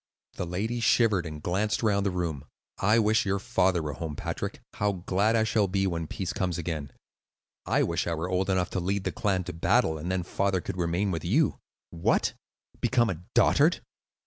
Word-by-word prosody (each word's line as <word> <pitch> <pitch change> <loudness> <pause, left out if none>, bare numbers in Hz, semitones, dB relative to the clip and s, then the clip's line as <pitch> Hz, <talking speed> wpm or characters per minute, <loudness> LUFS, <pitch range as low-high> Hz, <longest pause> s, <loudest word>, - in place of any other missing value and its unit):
The 90 - -4
lady 110 +7 -2
shivered 110 -6 +3
and 75 -1 -8
glanced 105 +6 0
round 100 -2 +2
the - - +2
room. 85 -6 -3 0.3
"I 105 +4 +4
wish 110 0 +3
your 100 0 0
father 95 -6 +1
were 75 -1 -3
home, 75 0 -5
Patrick. - - -4
How 105 0 0
glad 100 +4 +1
I 110 - +3
shall 110 -2 +2
be 95 +1 0
when 85 -3 -2
peace 90 +2 -4
comes 90 -3 -1
again." 80 -4 -4 0.8
"I - - +3
wish - - -1
I 85 - 0
were 80 +3 -3
old 95 +1 0
enough 90 -1 +1
to 95 - -1
lead 95 +2 -1
the - - -1
clan 95 -3 0
to 90 0 -6
battle, 80 -1 +2
then 90 +1 -1
father 95 +1 0
could 90 - -5
remain 90 +3 0
with 80 -3 -3
you." - - +2 0.3
"What? 85 0 +1 0.5
become 120 -4 +2
a 85 -2 -6
dotard? - - +4
95 Hz, 195 wpm, -28 LUFS, 85-100 Hz, 0.8 s, I